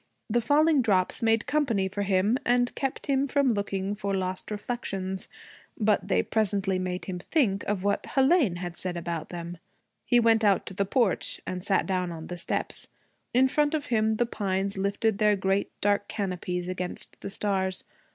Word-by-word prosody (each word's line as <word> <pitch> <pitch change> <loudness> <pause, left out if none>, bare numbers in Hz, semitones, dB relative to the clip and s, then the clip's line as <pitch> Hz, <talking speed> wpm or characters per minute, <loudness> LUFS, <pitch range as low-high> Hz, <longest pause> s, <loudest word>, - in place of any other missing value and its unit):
The 240 +2 +3
falling 295 +4 +4
drops 190 -6 +2
made 225 -1 +3
company 245 -11 +1
for 190 +2 -4
him, 200 +5 +2
and 245 0 +2
kept 270 -1 -3
him 275 0 +1
from 280 0 +2
looking 200 -2 -1
for 200 -1 -2
lost 185 -1 -2
reflections. 195 -3 -3 0.5
But 210 -3 +2
they 195 - +2
presently 200 -3 0
made 185 0 -3
him 180 -2 -4
think 205 - +1
of 200 -2 -1
what 200 0 +1
Hélène 270 - +3
had 175 -1 -5
said 180 -1 -3
about 170 -2 -4
them. 170 -1 -6 0.5
He 245 - +5
went 225 -1 +4
out 200 -2 +3
to - - -7
the 200 +1 0
porch 225 -1 +1
and 180 -1 -4
sat 195 -1 +2
down 180 -2 -1
on 160 -1 -7
the 175 - -6
steps. 170 - -2 0.4
In 255 +2 +5
front 295 +3 +2
of 295 -2 -2
him 220 0 +3
the 240 - +2
pines 195 -3 -2
lifted 200 +2 0
their 210 -1 +4
great 195 +1 0
dark 205 0 +2
canopies 180 -3 -3
against 180 -1 -5
the - - -5
stars. 190 -2 -1
200 Hz, 180 wpm, -27 LUFS, 185-230 Hz, 0.5 s, He